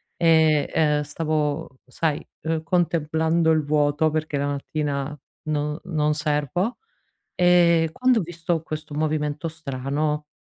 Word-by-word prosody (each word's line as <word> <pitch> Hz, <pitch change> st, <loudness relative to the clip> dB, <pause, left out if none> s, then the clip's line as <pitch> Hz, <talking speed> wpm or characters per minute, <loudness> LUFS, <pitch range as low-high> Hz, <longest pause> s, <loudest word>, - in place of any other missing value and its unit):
E, 160 Hz, -3 st, +4 dB
ehm, 150 Hz, -2 st, +2 dB
stavo 150 Hz, -2 st, -2 dB
sai, 150 Hz, +3 st, -2 dB, 0.2 s
uhm, 160 Hz, 0 st, -1 dB
contemplando 160 Hz, -1 st, +1 dB
il 155 Hz, -2 st, +2 dB
vuoto, 150 Hz, +1 st, +2 dB
perché 155 Hz, -1 st, -2 dB
la 140 Hz, 0 st, 0 dB
mattina 145 Hz, 0 st, -3 dB, 0.3 s
non-non 150 Hz, +1 st, -1 dB
servo. 150 Hz, -, -1 dB, 0.6 s
Ehm, 170 Hz, -2 st, +4 dB
quando 250 Hz, +5 st, +2 dB
ho -, -, 0 dB
visto 170 Hz, -1 st, -2 dB
questo 155 Hz, -1 st, -7 dB
movimento 150 Hz, 0 st, -1 dB
strano, 150 Hz, 0 st, -3 dB
155 Hz, 115 wpm, -24 LUFS, 150-165 Hz, 0.6 s, E